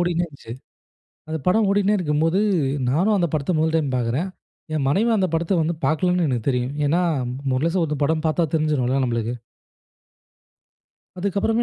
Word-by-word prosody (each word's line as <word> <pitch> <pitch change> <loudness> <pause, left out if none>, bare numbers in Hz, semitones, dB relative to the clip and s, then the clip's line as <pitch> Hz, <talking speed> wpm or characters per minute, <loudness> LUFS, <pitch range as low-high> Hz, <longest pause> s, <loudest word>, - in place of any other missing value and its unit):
ஓடிட்டே 175 0 +1
இருந்துச்சு. 140 -7 -11 0.8
அந்த 160 - -2
படம் 215 +3 +3
ஓடினே 205 +1 +2
இருக்கும்போது, 165 +1 +1 0.5
நானும் 185 +11 +2
அந்த 175 -2 +1
படத்த 150 +2 0
முதல் 160 0 +1
டைம் 155 -4 +1
பாக்குறேன். 125 +10 -1 0.4
என் 150 -3 0
மனைவியும் 220 +9 +2
அந்த 190 -2 +2
படத்த 170 +2 +1
வந்து, 165 +2 -1
பாக்கலன்னு 180 +2 +1
எனக்கு 120 -2 -2
தெரியும். 125 +1 -1
ஏன்னா, 170 +5 +2 0.5
முழுஷா 165 +8 +1
ஒருத்தன் 150 -2 -1
படம் 160 +2 0
பாத்தா, 165 +2 +1
தெரிஞ்சுரும்ல 135 -4 +1
நம்மளுக்கு. 115 -1 -2 1.8
அதுக்கப்பறமே, 200 +5 0
160 Hz, 145 wpm, -22 LUFS, 140-180 Hz, 1.8 s, படம்